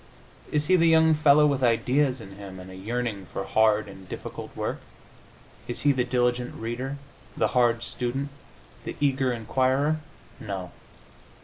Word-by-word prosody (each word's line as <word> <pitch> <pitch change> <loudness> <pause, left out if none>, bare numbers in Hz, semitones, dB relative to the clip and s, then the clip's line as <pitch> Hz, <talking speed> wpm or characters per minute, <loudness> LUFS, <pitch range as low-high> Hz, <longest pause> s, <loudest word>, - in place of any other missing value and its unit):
Is 150 0 +1
he 185 - +4
the 170 -1 +4
young 160 0 +6
fellow 150 -1 +5
with 140 -3 +1
ideas 125 +3 +2
in 95 - -10
him, 95 -2 -9
and 90 0 -10
a - - -10
yearning 105 -1 -3
for 100 - -3
hard 110 +2 +3
and 95 -1 -12
difficult - - -7
work? - - -3 0.9
Is 120 - -4
he 145 - +4
the 130 -2 +1
diligent 125 0 0
reader, 125 +5 -4 0.4
the - - +2
hard 120 -2 +2
student, 130 +4 -2 0.5
the - - -5
eager 135 -2 +2
inquirer? 130 +6 +1 0.4
No. 95 -4 -5
125 Hz, 150 wpm, -26 LUFS, 110-140 Hz, 0.9 s, young